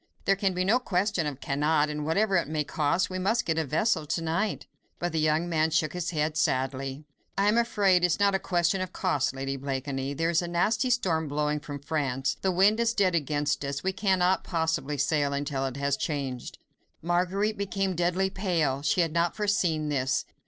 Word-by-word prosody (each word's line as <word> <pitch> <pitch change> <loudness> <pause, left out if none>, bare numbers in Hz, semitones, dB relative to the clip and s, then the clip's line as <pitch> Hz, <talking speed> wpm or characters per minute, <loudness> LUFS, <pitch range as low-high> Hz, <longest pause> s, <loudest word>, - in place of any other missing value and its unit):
There 195 - +4
can 195 -1 0
be 180 0 0
no 225 +6 +4
question 185 -7 0
of 140 -2 -6
cannot, 150 +2 +1
and 150 0 -4
whatever 195 +6 +1
it 170 -6 +2
may 155 0 -1
cost, 155 +6 0
we 185 - -3
must 220 +5 +1
get 160 -1 0
a - - +1
vessel 160 - 0
to 165 +2 -1
night." 170 +6 -1 0.3
But 175 0 -2
the 160 - -1
young 155 +2 +1
man 160 -2 +1
shook 160 -1 0
his 180 -1 -3
head 155 -2 -1
sadly. 135 +1 -1 0.3
"I 200 +1 +3
am 210 - +4
afraid 210 -5 +3
it 180 - +4
is 170 - -1
not 200 -1 +3
a 195 - +1
question 175 +1 +1
of 185 -1 -4
cost, 145 -8 0
Lady 135 0 -3
Blakeney. 135 0 -3
There 165 +3 0
is 165 - +2
a 175 - -4
nasty 215 +9 +1
storm 170 -10 +1
blowing 150 +1 -1
from 145 -1 -7
France, 140 -3 -1
the 190 - +1
wind 195 +5 +4
is 235 0 +1
dead 190 -3 +2
against 145 -3 0
us, 140 +1 -4
we 190 0 0
cannot 190 -2 +2
possibly 160 -4 -1
sail 145 0 +1
until 140 -1 -2
it 130 0 -6
has 140 0 0
changed." 140 -5 -4 0.5
Marguerite 185 +5 0
became 195 -1 -1
deadly 180 +3 +1
pale. 170 -9 0
She 150 +5 +2
had 165 -2 0
not 170 0 +1
foreseen 175 -7 0
this. 135 -2 0
165 Hz, 205 wpm, -27 LUFS, 145-190 Hz, 0.5 s, There